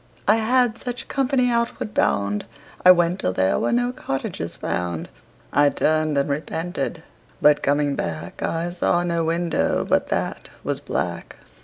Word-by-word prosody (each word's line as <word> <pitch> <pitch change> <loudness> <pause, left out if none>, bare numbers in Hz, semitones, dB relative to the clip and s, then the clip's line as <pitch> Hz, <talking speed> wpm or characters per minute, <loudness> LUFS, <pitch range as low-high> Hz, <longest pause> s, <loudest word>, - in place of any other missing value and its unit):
I 215 +2 +5
had 240 +1 +2
such 245 -1 -5
company 260 -2 +1
outward 235 -2 -1
bound. 100 +1 +1 0.4
I 180 - +8
went 175 0 +5
till 90 - 0
there 95 +1 +2
were - - 0
no 245 +1 +1
cottages 135 - -4
found. 85 -2 -3 0.4
I 145 +1 +5
turned 155 0 +1
and 140 - +2
repented, 160 +1 -3 0.4
but 150 0 +5
coming 145 0 +1
back 80 -2 -5
I 170 +1 -1
saw 175 0 +1
no 170 -1 0
window 165 0 0
but - - +1
that - - -2
was - - -2
black. - - -4
165 Hz, 150 wpm, -23 LUFS, 140-220 Hz, 0.4 s, I